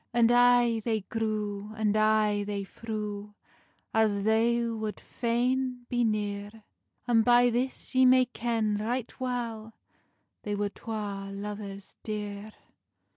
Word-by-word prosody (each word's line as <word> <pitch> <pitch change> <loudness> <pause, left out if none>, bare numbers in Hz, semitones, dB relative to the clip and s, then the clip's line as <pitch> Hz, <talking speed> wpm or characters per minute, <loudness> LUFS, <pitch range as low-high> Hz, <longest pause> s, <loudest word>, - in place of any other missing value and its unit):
And 235 -1 +5
ay 245 -1 +5
they 220 -2 0
grew, 210 0 -3
and 215 -1 +1
ay 215 -1 +3
they 200 -1 -3
threw, 210 -1 -6 0.6
As 210 -3 +2
they 230 +2 +3
wad 220 -2 -4
faine 250 +1 -1
be 245 -1 +1
neare; 210 0 -2 0.4
And 235 -2 +4
by 245 +1 +5
this 255 +4 -3
ye 260 0 +6
may 255 0 +6
ken 225 -3 -1
right 235 +3 -2
weil 230 -3 -3 0.7
They 205 -1 -3
were 205 0 -1
twa 200 -2 -5
luvers 200 -1 -7
deare. 210 -1 -5
220 Hz, 125 wpm, -29 LUFS, 205-240 Hz, 0.7 s, ye